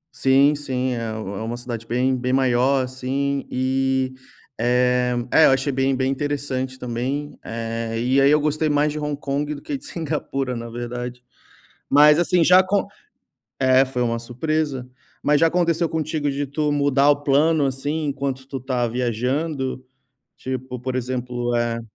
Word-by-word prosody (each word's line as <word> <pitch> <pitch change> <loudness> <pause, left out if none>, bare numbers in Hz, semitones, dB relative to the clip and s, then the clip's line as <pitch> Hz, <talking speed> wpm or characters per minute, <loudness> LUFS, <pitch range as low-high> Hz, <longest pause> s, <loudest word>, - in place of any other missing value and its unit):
Sim, 135 +2 +4
sim, 130 -3 -2
é 120 - -3
é 110 - -3 0.3
uma 115 +2 -4
cidade 120 -2 -6
bem 130 +2 +1
bem 125 0 -2
maior, 130 +1 +2
assim. 135 +2 -2
E, 130 0 0 0.5
eh, 125 +1 +2 0.2
é, 160 - +6
eu - - +5
achei 135 +2 +1
bem 135 0 +1
bem 130 +1 0
interessante 135 -2 -3
também, 130 +4 -3
eh, 115 0 -4
e 130 +3 +2
aí 135 - +5
eu 150 +1 +5
gostei 155 +1 0
mais 145 +1 +2
de 150 - -4
Hong 150 -1 -3
Kong 145 +1 -2
do - - -8
que 295 - -4
de 275 - -8
Singapura, 140 -5 -3
na 115 0 -6
verdade, 120 +1 -6 0.6
mas, 150 +1 +6
assim, 175 0 +3
já 180 +3 +7
acon 190 +2 +2 0.7
é, 130 0 +4
foi 130 -2 -3
uma 115 -1 0
surpresa, 130 +2 -2 0.3
mas 150 0 +3
já 165 - +5
aconteceu 170 0 +1
contigo 155 -2 -2
de 140 +1 -1
tu 150 +2 -1
mudar 140 0 +3
o 145 0 +1
plano, 145 +2 +3
assim, 145 +4 -2
enquanto 135 -2 -3
tu 135 - -4
tá 130 -1 -1
viajando, 130 +4 -2 0.6
tipo, 130 -1 -5
por 130 +1 -4
exemplo, 125 -1 -2
eh 120 0 0
135 Hz, 165 wpm, -22 LUFS, 125-145 Hz, 0.7 s, já